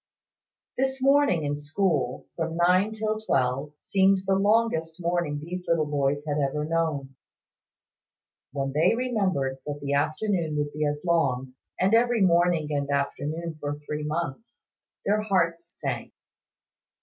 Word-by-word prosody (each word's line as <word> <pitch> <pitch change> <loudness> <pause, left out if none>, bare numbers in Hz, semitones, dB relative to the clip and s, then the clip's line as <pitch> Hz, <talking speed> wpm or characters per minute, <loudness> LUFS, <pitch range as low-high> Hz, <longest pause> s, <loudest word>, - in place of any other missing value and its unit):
This 265 0 0
morning 275 - +4
in 145 0 -1
school, 145 -3 -1
from 165 -1 -2
nine 180 +4 +3
till 215 0 -2
twelve, 135 -5 0
seemed 190 0 +3
the 195 - +2
longest 195 -5 +1
morning 170 -4 -1
these 180 +4 -6
little 165 -2 +2
boys 145 0 0
had 150 -1 -1
ever 145 +2 0
known. 155 -5 -1 1.4
When 135 -1 -2
they 155 +10 +3
remembered 190 - 0
that 145 0 -4
the 140 0 -2
afternoon 155 +2 0
would 145 0 -2
be 150 0 0
as 145 0 -3
long, 135 -7 +1 0.3
and 190 +3 +3
every 235 -1 +4
morning 170 -3 +3
and 140 -1 -1
afternoon 150 +3 -2
for 145 0 -3
three 150 +1 -5
months, 150 - -4 0.4
their 210 +1 +2
hearts 170 -5 0
sank. 135 -5 -4
160 Hz, 135 wpm, -26 LUFS, 145-190 Hz, 1.4 s, morning